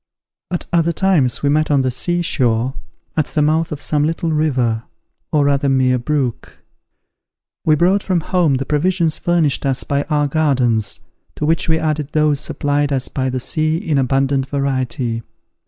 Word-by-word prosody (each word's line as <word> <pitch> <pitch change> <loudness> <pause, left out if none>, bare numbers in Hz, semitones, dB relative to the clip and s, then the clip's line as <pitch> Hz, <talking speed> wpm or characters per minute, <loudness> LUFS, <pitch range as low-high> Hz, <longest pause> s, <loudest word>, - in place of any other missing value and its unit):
At 175 - -3
other 170 0 +2
times 160 -10 +1
we 140 - +3
met 155 +2 +2
on 140 -2 +3
the 130 - 0
sea 175 +7 -1
shore, 125 -4 +1 0.4
at 155 - +1
the 150 - -1
mouth 160 +2 +1
of 150 - -4
some 150 -1 0
little 165 +1 -1
river, 130 -8 +1 0.5
or 150 -2 +3
rather 140 0 +2
mere 130 -1 +2
brook. 130 -2 -2 1.1
We 155 - +5
brought 185 +6 +3
from 185 -4 0
home 170 -4 +1
the 135 +1 -2
provisions 165 +2 +1
furnished 170 -5 +1
us 135 -2 -1
by 140 0 0
our 150 -1 +2
gardens, 130 -9 0 0.3
to 150 - -2
which 165 +2 +1
we 160 - +3
added 155 -2 -2
those 150 -2 +2
supplied 145 0 -1
us 130 -2 -1
by 130 -1 -2
the 130 0 -2
sea 155 +5 0
in 160 -6 0
abundant 135 +1 +1
variety. 130 -4 -2
145 Hz, 170 wpm, -18 LUFS, 130-160 Hz, 1.1 s, We